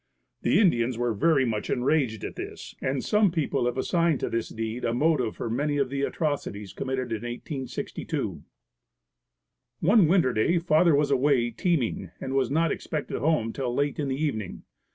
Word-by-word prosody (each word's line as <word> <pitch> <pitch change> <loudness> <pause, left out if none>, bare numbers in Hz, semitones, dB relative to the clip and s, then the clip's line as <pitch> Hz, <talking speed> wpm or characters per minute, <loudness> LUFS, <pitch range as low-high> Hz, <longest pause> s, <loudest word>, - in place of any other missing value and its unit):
The - - +3
Indians 125 - +2
were 120 -1 0
very 135 +4 +3
much 110 -3 -2
enraged 125 -4 +1
at - - -5
this - - -7
and 130 0 -1
some 210 -2 +3
people 145 -6 0
have 125 - -2
assigned 170 +1 +1
to - - -2
this 115 0 -1
deed 115 +2 -4
a 115 - 0
motive 140 -5 +1
for - - -4
many 145 +6 0
of 135 -2 0
the 140 0 -2
atrocities 140 - -2
committed 130 -2 -3
in 110 - -2
1862. 125 +2 -4 1.4
One 195 +1 +5
winter 165 -7 +3
day 140 +11 +2
father 165 -1 +4
was 145 0 +2
away 130 -3 +3
teaming 135 -1 -1
and 135 - -4
was 135 -1 +1
not 165 +4 +2
expected 150 -2 -3
home 140 -5 +1
till 130 -3 -2
late 145 +2 0
in 145 - -1
the 135 +1 -2
evening. 110 - -3
135 Hz, 175 wpm, -26 LUFS, 120-155 Hz, 1.4 s, One